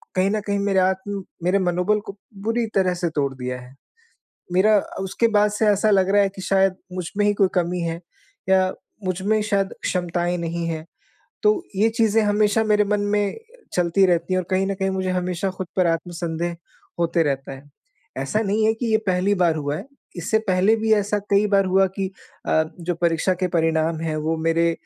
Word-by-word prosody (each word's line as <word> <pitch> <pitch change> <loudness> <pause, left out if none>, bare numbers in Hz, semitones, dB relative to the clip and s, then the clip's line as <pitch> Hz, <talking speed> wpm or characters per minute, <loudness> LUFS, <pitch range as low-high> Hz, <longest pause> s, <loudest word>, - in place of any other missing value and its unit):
कहीं 185 +1 +2
न 215 - 0
कहीं 200 0 0
मेरे 200 -1 +2
आत्म, 190 +1 -1 0.2
मेरे 185 +3 +2
मनोबल 180 +3 +1
को 200 - -8 0.3
बुरी 230 +1 0
तरह 185 -2 +3
से 175 -1 -1
तोड़ 140 -3 -1
दिया 125 0 -4
है। 125 +2 -14 0.8
मेरा 205 +3 +5 0.2
उसके 195 +5 0
बाद 210 0 +4
से 215 +1 0
ऐसा 210 +1 +3
लग 190 -1 +3
रहा 205 0 +5
है 195 - +2
कि 190 - -7
शायद 195 -1 +2 0.2
मुझमें 185 +3 -2
ही 205 - +4
कोई 195 -2 +3
कमी 180 0 0
है 165 0 -3 0.5
या 190 0 +4 0.3
मुझ 185 0 -2
में 215 +2 +2
शायद 200 -2 0
क्षमताएँ 175 -1 -1
नहीं 170 0 -3
हैं। 160 -1 -4 0.6
तो 425 -4 +3
ये 215 +4 +3
चीज़ें 225 0 +4
हमेशा 210 +1 +2
मेरे 210 -1 +3
मन 205 0 0
में 205 - 0 0.4
चलती 180 +2 +3
रहती 175 0 +1
हैं 185 - +2
और 175 - -10
कहीं 190 +1 +2
न 195 - -1
कहीं 190 0 -1
मुझे 190 -1 -2
हमेशा 180 +1 -1
खुद 185 -1 -6
पर 180 -2 +4
आत्मसंदेह 170 0 -2 0.4
होते 170 0 +2
रहता 135 -2 -2
है। 135 +2 -13 0.5
ऐसा 135 +11 -1
नहीं 215 +1 +1
है 220 - +3
कि 235 +1 -3
ये 220 - +5
पहली 185 +2 +2
बार 175 -4 +2
हुआ 145 -1 -2
है, - - -8 0.3
इससे 205 +6 +1
पहले 190 +4 +3
भी 220 0 +2
ऐसा 205 0 +1
कई 200 +1 +4
बार 195 -1 +3
हुआ 190 +1 +3
कि 195 -1 -2 0.4
अ, 160 - +3 0.2
जो 175 0 -2
परीक्षा 170 +2 +1
के 185 - +2
परिणाम 160 -1 +1
हैं 160 -1 -2
वो 160 +1 -1
मेरे 165 +1 +2
185 Hz, 200 wpm, -22 LUFS, 170-205 Hz, 0.8 s, मेरा